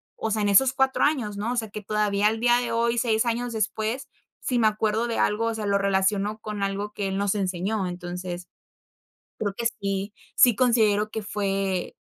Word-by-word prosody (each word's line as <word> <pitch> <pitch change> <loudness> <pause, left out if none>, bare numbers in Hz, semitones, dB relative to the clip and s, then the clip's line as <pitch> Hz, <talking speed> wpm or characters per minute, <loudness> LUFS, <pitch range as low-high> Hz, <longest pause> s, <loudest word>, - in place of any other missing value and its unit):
o 220 - -3
sea, 215 0 0
en 205 - +2
esos 255 +7 +5
4 265 -1 +2
años, 255 -9 +1
¿no? 215 +4 -2
O - - -3
sea, 225 -3 -2
que 210 - -6
todavía, 210 0 +1
al 220 +1 0
día 240 +1 +4
de 240 -1 -3
hoy, 235 +1 +1
6 225 -1 +1
años 240 +1 -1
después, 220 +4 -2 0.3
si 250 -2 0
me 220 - +5
acuerdo 215 +2 0
de 230 - -2
algo, 215 +2 +1
o 230 0 -1
sea, 215 -1 -4
lo 200 0 +2
relaciono 200 +2 +1
con 215 -2 -6
algo 200 +1 -2
que 205 -2 -2
él 190 0 -2
nos 200 0 +1
enseñó. 195 0 -1
Entonces, 180 0 -6 0.9
creo 205 -2 -2
que 235 +1 +1
sí, 195 0 -2 0.2
sí 245 -3 +6
considero 215 -3 +3
que 220 - -3
fue 195 -3 -2
210 Hz, 205 wpm, -25 LUFS, 200-230 Hz, 0.9 s, sí